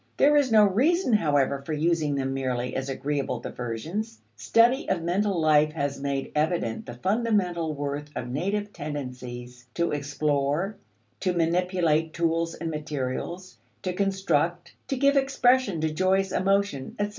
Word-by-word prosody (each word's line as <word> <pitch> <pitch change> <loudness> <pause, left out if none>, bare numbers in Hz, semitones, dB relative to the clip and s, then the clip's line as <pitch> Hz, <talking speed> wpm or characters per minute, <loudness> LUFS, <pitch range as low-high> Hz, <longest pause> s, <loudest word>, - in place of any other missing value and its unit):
There 295 +1 +5
is 285 -4 +3
no 215 -1 +7
reason, 265 - +2
however, 145 -7 +2
for 155 - -4
using 155 -1 +1
them 135 -1 -1
merely 125 -2 -2
as 130 +1 -3
agreeable 140 +1 -2
diversions. 165 - -5 0.2
Study 240 +4 +3
of 175 -3 0
mental 190 +2 0
life 155 -1 +4
has 140 -3 -2
made 140 -1 -2
evident 150 -7 -1
the - - -7
fundamental 185 - 0
worth 145 +1 -4
of 125 - -4
native 200 +10 -2
tendencies 125 -4 -7
to 170 - 0
explore, 145 +5 -1 0.4
to 185 -2 0
manipulate 170 -2 +1
tools 165 0 0
and 165 -1 -4
materials, 150 +4 -4 0.2
to 185 - -1
construct, 180 -3 0
to 270 - -2
give 280 +2 +3
expression 260 -7 +3
to 160 0 0
joyous 190 +3 +2
emotion, 195 -8 0
etc. 205 0 0
165 Hz, 145 wpm, -26 LUFS, 140-195 Hz, 0.4 s, no